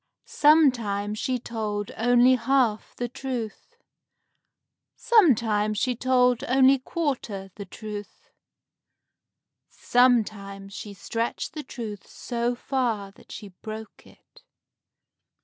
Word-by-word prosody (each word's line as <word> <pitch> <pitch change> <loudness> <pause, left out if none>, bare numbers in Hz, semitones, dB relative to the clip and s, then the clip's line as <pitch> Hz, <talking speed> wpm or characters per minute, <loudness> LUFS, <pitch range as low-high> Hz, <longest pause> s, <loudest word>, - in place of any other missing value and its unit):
Sometimes 230 -9 +3
she 255 -1 -1
told 215 -4 -4
only 245 +2 +4
half 250 -3 +1
the 245 - -3
truth; 250 - -6 1.2
sometimes 225 - +3
she 250 +3 0
told 250 0 +2
only 265 +1 +4
quarter 250 - -3
the 200 - -8
truth; 210 +1 -9 1.4
sometimes 205 -5 +1
she 205 0 -8
stretched 230 +4 -3
the 310 - -5
truth 220 -7 -8
so 240 0 -3
far 235 -6 -2
that - - -19
she 210 -2 -8
broke 220 -1 -9
it. - - -21
235 Hz, 95 wpm, -25 LUFS, 210-255 Hz, 1.4 s, only